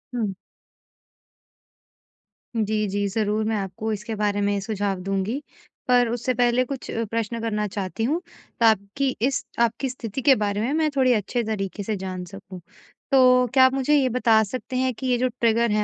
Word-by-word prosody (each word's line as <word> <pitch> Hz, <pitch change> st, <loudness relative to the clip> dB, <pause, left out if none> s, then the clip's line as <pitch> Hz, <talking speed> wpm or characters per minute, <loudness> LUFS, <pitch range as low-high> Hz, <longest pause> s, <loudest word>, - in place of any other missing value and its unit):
हुँ। 210 Hz, -5 st, -1 dB, 2.2 s
जी, 215 Hz, -1 st, 0 dB
जी, 200 Hz, +1 st, -1 dB
ज़रूर, 215 Hz, +1 st, 0 dB
मैं 220 Hz, 0 st, 0 dB
आपको 195 Hz, +3 st, -4 dB
इसके 210 Hz, +2 st, -5 dB
बारे 205 Hz, -1 st, 0 dB
में 200 Hz, 0 st, +1 dB
सुझाव 200 Hz, -2 st, -2 dB
दूँगी। 195 Hz, +8 st, -2 dB, 0.5 s
पर 245 Hz, -1 st, +4 dB
उससे 245 Hz, +2 st, -1 dB
पहले 245 Hz, +1 st, +3 dB
कुछ 270 Hz, 0 st, -6 dB, 0.2 s
प्रश्न 230 Hz, 0 st, -2 dB
करना 210 Hz, -2 st, -1 dB
चाहती 200 Hz, +3 st, -4 dB
हूँ, 315 Hz, +9 st, 0 dB, 0.4 s
ताकि 225 Hz, +4 st, +2 dB
इस 265 Hz, +2 st, +1 dB, 0.2 s
आपकी 235 Hz, +3 st, +1 dB
स्थिति 245 Hz, 0 st, -5 dB
के 270 Hz, -1 st, +6 dB
बारे 205 Hz, 0 st, -1 dB
में 245 Hz, +5 st, -1 dB
मैं 315 Hz, -1 st, +2 dB
थोड़े 255 Hz, -2 st, +4 dB
अच्छे 230 Hz, +3 st, -1 dB
तरीके 205 Hz, -2 st, -3 dB
से 215 Hz, +1 st, -2 dB
जान 185 Hz, -1 st, -5 dB
सकूँ। 190 Hz, -1 st, -10 dB, 0.5 s
तो 255 Hz, -1 st, +6 dB
क्या 260 Hz, -1 st, +7 dB
आप 260 Hz, -, +3 dB
मुझे 270 Hz, +2 st, +2 dB
ये 265 Hz, -3 st, +3 dB
बता 230 Hz, -2 st, +4 dB
सकते 255 Hz, +3 st, -6 dB
हैं 255 Hz, -1 st, +1 dB
कि 260 Hz, +3 st, -5 dB
ये 250 Hz, -1 st, +2 dB
जो 255 Hz, +1 st, +1 dB
ट्रिगर 230 Hz, -1 st, +2 dB
हैं, 210 Hz, 0 st, +2 dB
225 Hz, 175 wpm, -24 LUFS, 205-255 Hz, 2.2 s, क्या